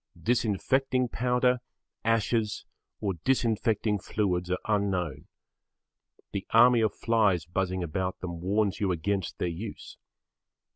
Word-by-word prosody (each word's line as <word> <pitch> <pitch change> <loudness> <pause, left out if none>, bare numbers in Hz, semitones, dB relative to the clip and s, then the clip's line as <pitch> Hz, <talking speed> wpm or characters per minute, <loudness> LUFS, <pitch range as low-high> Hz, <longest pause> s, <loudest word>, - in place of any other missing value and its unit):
Disinfecting 125 +3 +1
powder, 125 +1 +2 0.4
ashes, 115 -1 0 0.4
or 100 -3 0
disinfecting 110 -4 +1
fluids 90 -4 -1
are 90 - +1
unknown. 95 -8 -1 1.0
The 100 - -4
army 120 +1 +6
of 110 -2 +2
flies 105 -8 +2
buzzing 95 +1 -1
about 90 +3 -3
them 85 -2 -6
warns 100 +2 +1
you 100 -3 +1
against 95 +2 -2
their - - -1
use. 85 -1 -7
105 Hz, 110 wpm, -28 LUFS, 90-115 Hz, 1.0 s, army